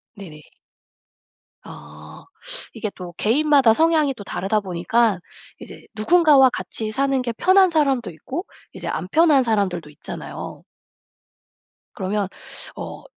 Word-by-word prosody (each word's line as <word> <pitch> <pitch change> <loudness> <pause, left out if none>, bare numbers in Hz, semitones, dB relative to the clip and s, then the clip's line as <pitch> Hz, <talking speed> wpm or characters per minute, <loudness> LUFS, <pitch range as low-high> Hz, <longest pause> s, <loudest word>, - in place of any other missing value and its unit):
네네. 160 -7 -11 1.2
아 75 +1 -12 0.5
이게 215 - -4
또 180 -2 -9
개인마다 275 0 +4
성향이 315 -1 +2
또 205 - -9
다르다 200 +2 -1
보니까 195 +3 0 0.4
이제 - - -12
누군가와 290 +1 +5
같이 220 -2 -5
사는 270 +2 0
게 240 -2 -2
편한 375 - +4
사람도 275 - +1
있고 265 - -6 0.3
이제 - - -7
안 180 - -3
편한 310 -3 +4
사람들도 195 -8 -1
있잖아요. 150 - -8 1.3
그러면 200 0 -2 0.5
어 - - -8
225 Hz, 250 characters per minute, -21 LUFS, 190-290 Hz, 1.3 s, 누군가와